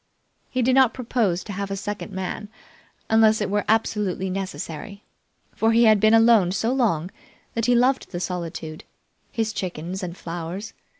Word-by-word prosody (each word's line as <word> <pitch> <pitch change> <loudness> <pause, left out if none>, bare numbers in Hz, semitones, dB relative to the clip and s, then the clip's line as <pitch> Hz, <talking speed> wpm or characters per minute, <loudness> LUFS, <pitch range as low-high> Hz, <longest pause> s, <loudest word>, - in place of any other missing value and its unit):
He 255 -1 0
did 255 +2 +3
not 260 -2 +4
propose 225 -8 0
to 205 - -7
have 200 +1 -4
a 195 - -2
second 205 +2 -5
man 190 +2 -5 0.6
unless 220 -1 +4
it 210 -2 -2
were 205 0 +1
absolutely 210 -4 0
necessary, 195 +1 -6 0.5
for 225 +1 +2
he 230 +1 +5
had 215 -2 +6
been 215 +2 +5
alone 225 -5 +5
so 225 +5 0
long 190 - 0 0.4
that 230 0 -1
he 245 - +4
loved 255 +2 +2
the 175 - -5
solitude, 170 -3 -5 0.5
his 220 -1 -1
chickens, 180 0 -4
and 180 -1 -5
flowers. 175 +5 -6
205 Hz, 165 wpm, -24 LUFS, 180-225 Hz, 0.6 s, had